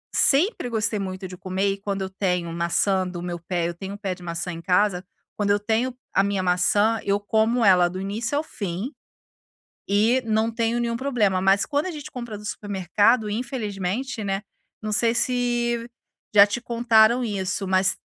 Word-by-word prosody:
sempre 290 - +3
gostei 215 -2 0
muito 190 0 -5
de 180 - -9
comer 190 +2 -1
e - - -7
quando 195 -1 -4
eu 190 - -4
tenho 180 -3 -1
maçã 185 +3 +1
do 175 -1 -6
meu 175 -1 -4
pé 170 0 -2
eu 170 - -4
tenho 190 +3 -7
um - - -9
pé 195 -3 -3
de 180 - -15
maçã 170 +1 -3
em 165 0 -7
casa. 180 0 +2 0.3
Quando 205 -1 -1
eu 205 0 +3
tenho 225 +4 0 0.2
a 195 - +4
minha 200 -2 -1
maçã, 205 +5 +2
eu 200 0 +1
como 220 +3 +1
ela 180 -2 +5
do 185 +1 -6
início 220 +8 -2
ao 305 - 0
fim 200 - -5 1.0
e 220 +6 +3
não 220 +1 +1
tenho 230 0 0
nenhum 235 -1 -1
problema, 220 -9 +1
mas 195 +1 +3
quando 290 +4 -1
a - - -2
gente 300 -4 -8
compra 240 -4 -6
no 210 - -11
supermercado, 205 +3 +1
infelizmente, 220 0 -3
né, 195 0 -2 0.4
não 215 0 -3
sei 230 +2 +3
se 240 -1 0 0.5
já 200 0 +9
te 240 +4 -3
contaram 235 0 +3
isso, 195 -2 -2
mas 190 0 +3
205 Hz, 185 wpm, -24 LUFS, 190-235 Hz, 1.0 s, já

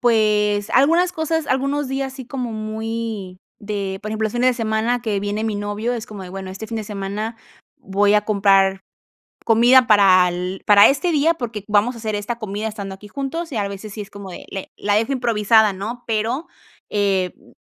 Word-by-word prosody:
Pues, 210 -3 +2
algunas 335 +7 +4
cosas, 320 -2 -1
algunos 275 +2 0
días, 270 0 -3
sí 265 -2 -9
como 250 -3 -4
muy 220 -3 -4 0.2
de, 200 -2 -4
por 215 - -5
ejemplo, 220 0 -1
los 215 - -6
fines 250 +1 +3
de 250 - -2
semana 225 +1 0
que 215 -4 -1
viene 205 +2 -2
mi 220 -2 -1
novio, 205 +4 -2
es 235 -1 -5
como 205 -4 -9
de: 180 - -8
"Bueno, 190 0 -7
este 200 +4 -7
fin 225 - -5
de 220 - -4
semana 210 +3 -4 0.4
voy 200 +2 +2
a 210 -1 +3
comprar 195 -2 +3 0.7
comida 240 +2 +6
para 190 -4 +6
el 180 +2 -4
para 205 -1 +8
este 305 +6 +1
día 315 +3 +3
porque 225 -7 -5
vamos 215 +4 +2
a 230 - -10
hacer 220 -1 -3
esta 205 +3 -3
comida 215 0 -4
estando 200 -3 -6
aquí 205 +2 -13
juntos", 280 +7 -4
y, 235 - -4
al 200 -1 0
veces, 200 +1 -8
si 215 - -6
es 200 - -13
como 200 -2 -9
de - - -9
le 195 - -6
la 205 0 0
dejo 225 +6 +1
improvisada, 220 -4 +3
¿no? 225 +6 -6
Pero, 230 +8 -1 0.4
eh, 195 -3 +1
mm, - - -22
215 Hz, 205 wpm, -21 LUFS, 200-240 Hz, 0.7 s, para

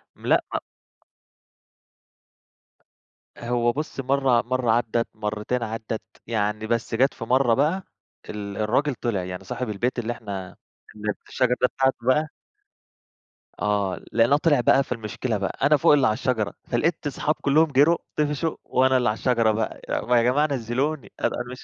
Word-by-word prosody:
م - - -14
لأ، - - +5 0.2
م - - +1 2.8
هو 120 0 0
بُصي، 150 -1 -4
مرة 135 -3 +3
مرة 125 -1 0
عدت، 115 0 +1
مرتين 110 +3 -2
عدت، 110 0 -4 0.3
يعني 110 -1 -1
بس 115 0 -1
جات 135 +4 +3
في - - -8
مرة 125 0 +3
بقى 155 +9 +1 0.5
ال 100 -1 -6
الراجل 125 +7 +1
طلع، 115 -6 -2
يعني 90 +1 -6
صاحب 120 +5 -4
البيت 120 +5 -1
اللي 120 0 -2
إحنا 100 -5 -7 0.4
اللي 105 0 -2 0.2
شجرة 125 -2 +1
دي 125 - +5
بتاعته 135 0 +2
بقى 150 +4 +3 1.3
آه، 100 -3 0
لقيناه 115 +5 +4
طلع 150 -4 +3
بقى، 135 +3 +4
فالمشكلة 115 -1 -3
بقى 100 -1 -3
أنا 150 +1 +5
فوق 140 - +5
اللي 140 -3 +4
على 110 - +2
الشجرة، 110 -2 -1
فلقيت 150 +6 0
صحابي 150 +2 -1
كلهم 155 +3 +3
جروا، 145 +5 +5 0.2
طفشوا، 150 +1 0
وأنا 130 0 +3
اللي 125 -4 +2
على 110 - -1
الشجرة 115 -4 +2
بقى. 110 0 -3
ي - - 0
ما 125 0 +4
يا 115 - +4
جماعة 145 +5 +3
نزلوني، 135 +4 -2
أنا - - +3
أنا 120 +1 -5
مش 130 - -9
120 Hz, 160 wpm, -24 LUFS, 110-135 Hz, 2.8 s, لأ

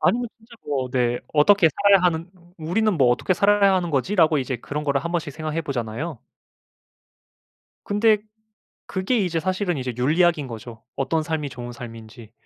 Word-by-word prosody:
아니면 240 0 +1
진짜 230 +1 -18
뭐 135 -3 -1
네 120 -1 +1 0.2
어떻게 170 +3 +5
살아야 200 +3 +4
하는 170 0 0 0.3
'우리는 195 +7 +1
뭐 130 -4 +4
어떻게 155 +9 +1
살아야 200 0 +4
하는 175 -2 0
거지?'라고 155 +2 +2
이제 130 -1 -2
그런 150 +5 -5
거를 140 -1 0
한번씩 170 -4 -2
생각해 155 +2 -3
보잖아요. 130 +2 -4 1.7
근데 210 +1 +3 0.7
그게 190 +6 -1
이제 175 -4 0
사실은 185 -1 -1
이제 125 -2 -3
윤리학인 155 +2 +2
거죠. 115 0 -9
어떤 155 +4 0
삶이 155 -3 -3
좋은 120 -1 -8
삶인지. 115 -1 -11
155 Hz, 350 characters per minute, -23 LUFS, 130-185 Hz, 1.7 s, 어떻게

